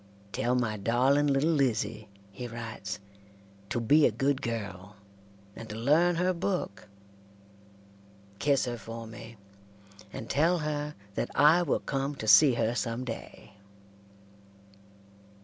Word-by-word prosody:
"Tell 120 +5 0
my 115 -4 0
darling 130 +7 +2
little 140 +3 +2
Lizzie," 115 -7 0 0.2
he 120 +5 -7
writes, 115 -3 -6 0.7
"to - - -1
be 145 +7 +5
a - - 0
good 140 -1 0
girl, 100 -3 -5 0.6
and 115 - -9
to 105 - -6
learn 155 +10 +3
her 180 +2 +1
book. 180 - -3 1.5
Kiss 140 -2 +2
her 120 -1 -4
for 115 +2 -8
me, 115 0 -11 0.7
and 110 - -7
tell 165 +5 +2
her 150 -1 -3 0.2
that - - -2
I 155 +4 +6
will 170 - 0
come 140 +1 -2
to 110 - -6
see 125 +5 +7
her 115 0 0
some 120 +1 -3
day." 115 -4 -8
125 Hz, 130 wpm, -29 LUFS, 115-145 Hz, 1.5 s, see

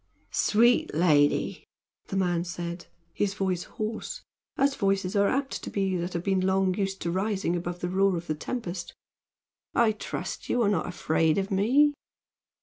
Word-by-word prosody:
"Sweet 235 -4 +3
lady," 150 -3 +3 0.4
the - - -5
man 175 -3 +1
said, 175 0 -5 0.3
his 200 -1 -1
voice 185 -3 -1
hoarse, 215 +1 -5 0.3
as 275 +1 +3
voices 195 -4 0
are 200 0 +4
apt 270 +3 -1
to - - -6
be 195 -2 0
that 175 +1 -3
have 170 - -2
been 195 -1 +1
long 190 0 +2
used 195 0 -2
to 170 - -1
rising 190 -1 0
above 175 0 -4
the 180 - -1
roar 190 0 +2
of 170 - -6
the 155 - -1
tempest, 175 0 -5 0.8
"I 235 -2 +5
trust 215 - -5
you 245 - +2
are 200 - +3
not 190 -6 0
afraid 160 -2 +1
of 195 +1 -1
me." 260 +10 +4
190 Hz, 165 wpm, -27 LUFS, 175-205 Hz, 0.8 s, I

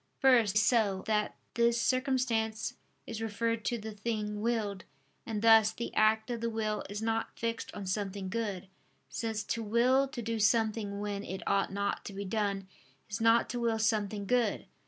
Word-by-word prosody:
First, 235 -6 +4
so 210 -3 +3
that 210 -1 0 0.2
this 235 0 +3
circumstance 245 -3 0 0.3
is 225 -1 -6
referred 225 +1 -1
to 240 - 0
the 220 0 -6
thing 210 -1 -3
willed. 215 -4 -1 0.4
And 220 -2 -3
thus 225 -1 +7
the 235 - -5
act 220 +2 +3
of 235 -1 -3
the 230 - 0
will 215 -1 -2
is 205 +2 -4
not 225 0 -1
fixed 230 0 -3
on 200 - -5
something 195 0 -3
good: 200 -2 -3 0.4
since 220 -2 -3
to 230 - -2
will 245 +5 +3
to 265 -2 -6
do 225 0 -2
something 215 -2 +1
when 205 -1 -3
it 190 -1 -6
ought 200 -1 +2
not 200 0 -2
to 200 - -6
be 200 +1 -5
done, 200 -1 -1 0.4
is 215 +3 -3
not 230 +1 +5
to 245 - -3
will 230 -1 +1
something 210 -2 0
good. 245 +3 +1
220 Hz, 175 wpm, -31 LUFS, 205-230 Hz, 0.4 s, thus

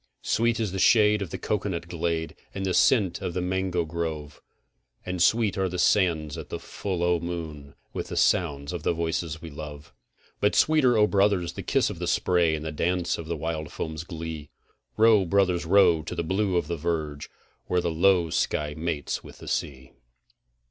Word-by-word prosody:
Sweet 115 0 +1
is 110 -4 -1
the 95 - -3
shade 105 0 +5
of 95 - -3
the - - -5
cocoanut 95 -5 -2
glade, 85 -1 -2 0.2
and 95 -1 -3
the 95 - 0
scent 100 -2 +3
of 85 - -4
the - - 0
mango 90 -1 -1
grove, 80 -3 -5 0.6
And 90 -1 -3
sweet 110 +1 +3
are 95 -1 +1
the 90 - -4
sands 85 -5 +2
at - - -9
the - - -4
full 95 -4 -4
o' 85 -1 +2
the 85 - -7
moon 75 -5 -6 0.2
with - - -4
the - - -5
sound 70 -4 +1
of 85 - -4
the 85 - +1
voices 80 0 -3
we 80 - -7
love. 75 -1 -9 0.5
But 105 - +2
sweeter, 140 -7 +4
O 105 - +6
brothers, 100 -4 +2
the - - -6
kiss - - +1
of - - -8
the - - -3
spray 85 -3 +2
and 75 0 -6
the 80 - -3
dance 85 +2 -1
of 80 - -7
the 85 0 -3
wild 80 0 -4
foam's 80 0 -5
glee: 80 -3 -7 0.5
Row, 110 -2 +6
brothers, 90 -2 +1
row 90 -3 +5
to 80 - -6
the - - -2
blue 95 +2 0
of 85 - 0
the 85 +2 -3
verge, 75 -3 -3 0.4
where 90 - +1
the 85 -1 -1
low 85 0 +3
sky 75 -1 0
mates 80 -2 -3
with - - -12
the - - -12
sea. 65 -3 -3
85 Hz, 195 wpm, -26 LUFS, 80-95 Hz, 0.6 s, O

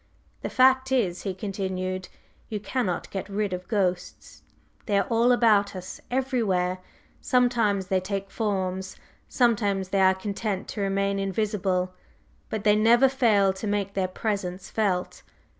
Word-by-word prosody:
"The - - -3
fact 260 0 +4
is," 195 -9 +1
he 195 -3 -4
continued, 185 -2 -4 0.4
"you 215 - -3
cannot 205 -4 -2
get 195 0 -5
rid 200 -1 -1
of 180 0 -5
ghosts! 185 -4 -2 0.5
They 205 -2 +2
are 200 - +2
all 230 +2 +4
about 215 -4 +3
us 185 0 -8
everywhere! 220 -9 0 0.4
Sometimes 235 -6 +2
they 190 0 +1
take 195 +1 -4
forms, 190 -3 -2 0.3
sometimes 205 -6 +1
they 195 0 +1
are 190 0 +5
content 200 0 -3
to 210 - -4
remain 195 0 0
invisible. 195 -2 -1 0.6
But 220 -2 -3
they 210 -1 +5
never 235 +5 +5
fail 215 -7 +3
to 190 +3 -6
make 200 -1 -1
their 190 -1 0
presence 190 -2 -4
felt. 195 -5 -1
200 Hz, 140 wpm, -26 LUFS, 190-220 Hz, 0.6 s, are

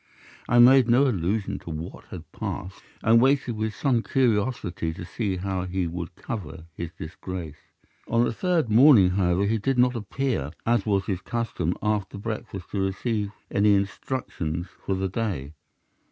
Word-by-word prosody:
I 120 - +4
made 125 0 +7
no 125 +4 +5
allusion 100 -1 -1
to - - -11
what 80 +1 -7
had - - -10
passed, 95 +2 -5 0.2
and 115 +1 +5
waited 135 -2 +2
with 110 -1 -2
some 125 0 +1
curiosity 105 -10 0
to 90 - -7
see 100 0 -2
how 95 0 -2
he 90 0 -1
would 85 +1 -5
cover 85 - -6
his 85 +1 -5
disgrace. 80 -1 -7 0.5
On 115 +1 +3
the - - 0
third 175 0 +1
morning, 110 -4 +7
however 90 0 +2
he 110 +2 +1
did 135 +5 0
not 125 0 +4
appear, 115 - -2
as 115 -3 +1
was 100 -2 +1
his 95 -3 -2
custom, 100 -8 -2
after 105 -2 -1
breakfast 100 -3 -6
to 100 - -1
receive 100 +2 -1 0.2
my - - 0
instructions 100 - 0 0.2
for 95 - -1
the 95 +1 -1
day. 90 - -3
100 Hz, 160 wpm, -25 LUFS, 90-120 Hz, 0.5 s, made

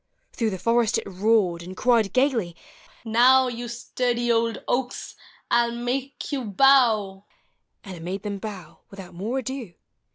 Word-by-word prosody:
Through 225 -2 0
the 190 - -4
forest 230 +2 +2
it - - -3
roared, 195 -2 +1
and 185 +2 -9
cried, 230 -5 +2
gayly, 250 - +1 0.5
u 225 - -6
Now, 255 +3 +5
You 240 0 -5
sturdy 240 0 -1
old 230 -1 0
oaks, 250 0 -2 0.4
I 240 0 +4
'11 235 +1 -5
make 270 +3 -3
you 275 -3 -2
bow! 215 -4 +3 0.3
" - - -51
And 190 -4 -9
it - - -11
made 190 +4 -5
them 200 -2 -4
bow 190 -6 -8
without 195 -4 -11
more 210 +9 -3
ado. 260 -7 -5
230 Hz, 165 wpm, -24 LUFS, 195-245 Hz, 0.5 s, Now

